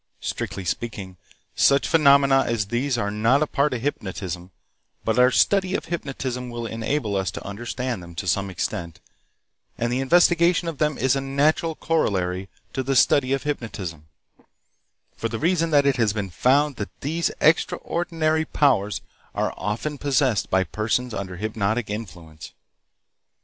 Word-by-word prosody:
Strictly 95 - -4
speaking, 95 0 -4 0.4
such 140 0 +3
phenomena 140 -4 +5
as 110 -4 -1
these 125 +2 0
are 100 -3 -1
not 115 +7 +3
a - - +1
part 145 0 +1
of 125 -2 -3
hypnotism, 95 - -4 0.6
but 115 +2 +1
our 125 0 +7
study 190 +7 +2
of - - -3
hypnotism 130 -6 -4
will 120 -1 -5
enable 115 0 -2
us 95 -2 0
to - - -8
understand 120 +2 -4
them 85 -1 -11
to 85 - -4
some 95 +2 0
extent, 90 -2 -4 0.8
and 120 +1 -1
the 125 - 0
investigation 170 +4 +4
of 165 -4 -4
them 150 -2 +1
is 130 0 +2
a 135 - -1
natural 150 +4 +1
corollary 95 - -1 0.2
to 130 - -1
the 135 +1 -1
study 130 +1 +4
of 135 -1 0
hypnotism, 95 - -5 1.1
for 115 - -3
the 115 - -3
reason 165 +3 +1
that 145 -2 +4
it 140 -2 +2
has 110 -4 +2
been 100 -4 -4
found 140 - +2
that 105 - -4
these 165 +4 0
extraordinary 160 0 +1
powers 120 -10 +1 0.3
are - - -1
often 115 +9 -3
possessed 135 -5 +1
by 95 0 +3
persons 110 +5 -1
under 95 -4 -5
hypnotic 110 +2 -1
influence. 85 -7 -8
125 Hz, 155 wpm, -23 LUFS, 100-145 Hz, 1.1 s, our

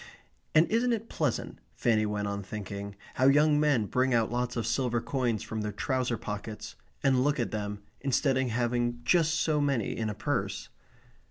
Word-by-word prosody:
And 155 +2 +7
isn't 235 +2 +3
it 225 0 -3
pleasant, - - -2 0.2
Fanny 110 -2 +2
went 105 -1 -2
on 100 0 -3
thinking, 100 0 -6 0.2
how 130 - +3
young 150 +2 +5
men 145 -8 +3
bring 130 +3 +1
out 115 -1 +2
lots 125 0 -1
of 115 -3 -1
silver 120 0 +1
coins 120 -4 -1
from 110 -1 -4
their 105 0 -2
trouser 130 0 -1
pockets, 105 +1 -6 0.3
and 130 -2 +4
look 145 0 +1
at 120 - -1
them, 105 -1 -4 0.2
instead 135 +1 +1
of 130 0 +1
having 120 0 0
just 160 +4 +3
so 155 -3 +1
many 135 -7 0
in 110 -1 -2
a 105 - -4
purse? - - -2
120 Hz, 180 wpm, -29 LUFS, 110-140 Hz, 0.3 s, And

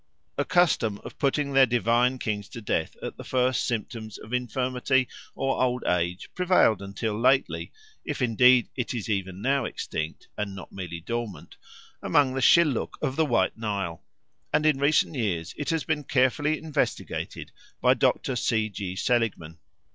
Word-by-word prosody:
A 145 - +1
custom 140 - +2
of - - -10
putting 140 0 0
their 135 -1 +6
divine 120 +2 +2
kings 105 -4 -3
to 115 - -8
death 105 - -2
at - - -5
the - - -8
first 130 -1 +1
symptoms 110 -2 -4
of 110 - -11
infirmity 125 +1 0 0.3
or 135 0 -1
old 125 -1 +1
age 90 +1 0
prevailed 180 - +3
until 100 +2 -3
lately, 125 +5 +1 0.3
if 150 - -4
indeed 125 0 +5
it 125 -1 -3
is 115 - -4
even 95 -2 -2
now 135 -1 +2
extinct 80 0 -5
and 105 -2 -4
not 95 - -10
merely 85 -3 -6
dormant, 115 +2 -5 0.5
among 140 -3 +3
the 135 - -2
Shilluk 150 -2 +4
of 130 - -2
the 160 - +2
White 95 -6 +1
Nile, 100 -7 -3 0.5
and 150 0 +2
in 150 -3 +3
recent 150 +3 +3
years 95 - -2
it 145 - -4
has 165 -2 0
been 150 -2 -1
carefully 145 +4 +2
investigated 155 -2 -3 0.3
by - - +5
Dr. 130 - +1
C. 110 -2 +1
G. 95 -2 -5
Seligman. 95 -9 -1
125 Hz, 160 wpm, -26 LUFS, 105-135 Hz, 0.5 s, their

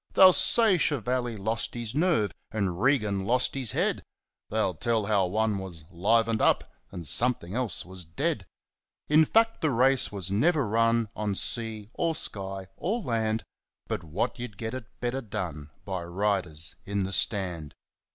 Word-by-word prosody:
They'll 185 -1 +8
say 190 +1 +4
Chevalley 125 -4 0
lost 110 +4 -3
his 115 -2 -4
nerve, 150 - +2 0.2
and 95 -4 -2
Regan 105 -8 +2
lost 125 +5 +2
his 130 -6 +1
head; - - +1 0.5
They'll 110 -3 +1
tell 110 +5 0
how 100 -3 +2
one 105 +1 0
was 90 -5 -6
ŌĆ£livened 110 +5 +2
upŌĆØ - - +3 0.3
and 85 - -7
something 115 - +1
else 120 -4 0
was 95 0 -5
ŌĆ£deadŌĆØ 80 +1 -2 0.6
In 155 +1 +6
fact, 225 +6 +2
the 155 - +2
race 130 +1 +3
was 95 -3 -4
never 140 - +2
run 115 +1 +2
on 105 -2 -2
sea, 110 0 -3
or 165 -1 0
sky, 95 -7 -4
or 215 +7 -1
land, 110 - -1 0.4
But - - -3
what 85 +9 -2
you'd 120 -5 -6
get 110 +2 -4
it 130 -3 -5 0.2
better 125 +2 -1
done 75 - -5 0.2
by 95 -3 -3
riders 85 -4 -1
in 100 -1 -1
the 95 +1 -3
Stand. 85 -3 0
110 Hz, 160 wpm, -27 LUFS, 95-125 Hz, 0.6 s, They'll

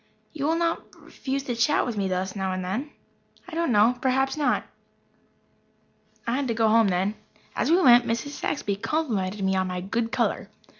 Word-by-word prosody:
"You 290 -2 -2
will 325 - +2
not 335 0 0 0.2
refuse 270 0 -4
to 255 - -3
chat 245 +6 +2
with 240 - -3
me 200 -2 -1
thus 185 +1 -2
now 190 -1 -2
and 185 0 -3
then?" 235 +11 -3 0.6
"I 360 - -11
don't 335 -4 0
know. 230 +3 +4
Perhaps 265 +1 +1
not." 300 -1 +1 1.6
I 235 +2 0
had 280 -1 -1
to 230 - -1
go 225 -1 +3
home 225 0 +5
then. 190 +2 0 0.4
As 255 - 0
we 340 +3 +5
went 245 -6 +6
Mrs. 230 +5 -1
Saxby 210 -8 -2
complimented 210 -8 -2
me 190 0 +1
on 190 0 +1
my 180 0 -3
good 225 +5 -2
colour. - - -1
230 Hz, 190 wpm, -25 LUFS, 195-275 Hz, 1.6 s, went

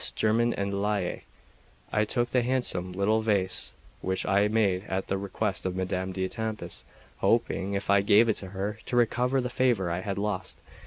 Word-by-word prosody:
Germain 115 +2 +2
en 100 0 -2
Laye, 105 -3 -1 0.7
I 110 0 +2
took 120 +2 -1
the 125 - +3
handsome 120 -8 -1
little 100 +4 +1
vase 100 -4 +2 0.3
which 95 0 -1
I 100 - +3
had 105 +1 +2
made 100 -4 +2
at 95 -1 -3
the 95 - +1
request 100 -1 -2
of 95 -1 -2
Madame 95 0 -2
d'Etampes, 105 +4 -4 0.3
hoping, 100 +1 +1
if 100 - -3
I 100 0 +5
gave 100 +3 +5
it 110 - +1
her, 100 +3 -4
to - - -2
recover 125 +2 +2
the 125 - -2
favour 120 -9 +1
I 85 - -1
had 100 0 -3
lost. 100 -2 -3
100 Hz, 175 wpm, -28 LUFS, 95-110 Hz, 0.7 s, I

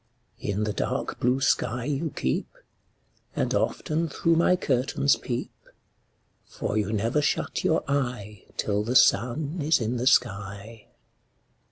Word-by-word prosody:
In 105 +1 -2
the 105 -1 -1
dark - - -3
blue 125 +2 +1
sky 120 -2 +1
you 150 +3 -1
keep, 65 - -2 0.9
And - - 0
often 160 +2 0
through 165 +3 +1
my 170 +2 +4
curtains 140 -3 +1
peep; 120 -1 -4 1.0
For - - -4
you 105 -1 0
never 115 +7 +1
shut 145 - -1
your - - +2
eye 120 -8 -3
Till 105 -1 0
the 120 +4 -2
sun 140 +8 +3
is 155 +2 +3
in 120 +1 -1
the 125 +2 -1
sky. 105 -2 0
125 Hz, 135 wpm, -26 LUFS, 105-145 Hz, 1.0 s, my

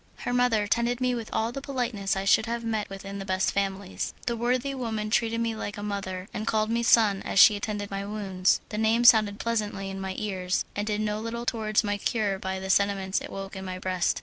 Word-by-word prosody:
Her 245 - -2
mother 245 -4 +3
tended 235 +3 0
me 250 -1 +1
with 230 -2 -4
all 225 +1 0
the 275 - -6
politeness 245 -9 -2
I 195 0 -2
should 215 +3 +4
have 235 0 -3
met 220 -2 -1
with 195 0 -8
in 200 0 -6
the - - -4
best 190 -1 0
families. 195 -1 -2
The 235 - 0
worthy 250 +4 0
woman 220 -5 -3
treated 230 +1 +1
me 230 -1 -1
like 205 -1 -5
a 205 - -6
mother, 195 -2 -4
and 215 +1 -4
called 215 0 +1
me 235 0 +1
"son" 215 -4 +4
as - - -4
she 210 - +9
attended 205 0 -3
to - - -8
my 195 0 -2
wounds. 195 -3 0
The 210 - -3
name 225 +2 +3
sounded 215 -4 +6
pleasantly 210 -4 -2
in 195 0 -6
my 190 0 -4
ears, 190 -3 -1
and 205 +1 -2
did 210 -1 0
no 210 0 -1
little 235 +1 -4
towards 220 -2 +1
my 205 -1 -1
cure 205 -3 0
by 190 0 -3
the 190 0 -1
sentiments 195 -1 +1
it - - -7
awoke 195 0 -7
in 190 - -6
my 185 -1 -5
breast. 185 -1 0
210 Hz, 240 wpm, -27 LUFS, 195-230 Hz, -, she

